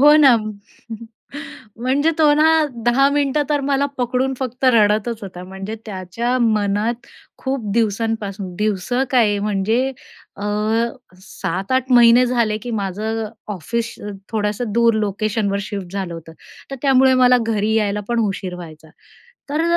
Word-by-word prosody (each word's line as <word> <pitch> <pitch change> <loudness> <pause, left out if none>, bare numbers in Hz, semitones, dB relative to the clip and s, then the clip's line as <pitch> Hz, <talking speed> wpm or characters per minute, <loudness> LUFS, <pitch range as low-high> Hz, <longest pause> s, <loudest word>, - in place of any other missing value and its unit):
हो 295 +2 +8
ना. 275 -6 +7 1.4
म्हणजे 265 +6 +1
तो 300 -2 +5
ना, 310 +1 +4 0.4
10 275 +3 +4
मिनिटं 290 0 +1
तर 290 -1 +2
मला 275 0 +1
पकडून 255 +2 0
फक्त 255 0 -4
रडतचं 220 -2 +2
होता 180 -1 -9
म्हणजे, 195 +3 -7
त्याच्या 210 +6 -2
मनात 215 +1 0 0.3
खूप 260 -6 -3
दिवसांपासून, 210 -4 -1
दिवसं 215 +4 0
काय 220 -5 +3
म्हणजे, 210 +5 0 0.5
अ, - - -8 0.8
7-8 235 +7 -2
महिने 240 +1 +7
झाले, 235 -3 0
की 240 +3 -7
माझं 215 +4 -3 0.3
ऑफिस 230 +7 -3 0.4
थोडंसं 210 +1 -1
दूर 230 +1 +3
लोकेशनवर 210 -1 -1
शिफ्ट 195 -3 -6
झालं 190 -4 -4
होतं. 165 0 -10 0.4
तर 275 - -5
त्यामुळे 265 -1 +5
मला 250 0 +6
घरी 220 0 0
यायला 210 -1 +1
पण 235 -1 +1
उशीर 190 -2 -4
व्हायचा. 160 -2 -11 0.6
तर 300 +3 0
225 Hz, 130 wpm, -20 LUFS, 200-255 Hz, 1.4 s, हो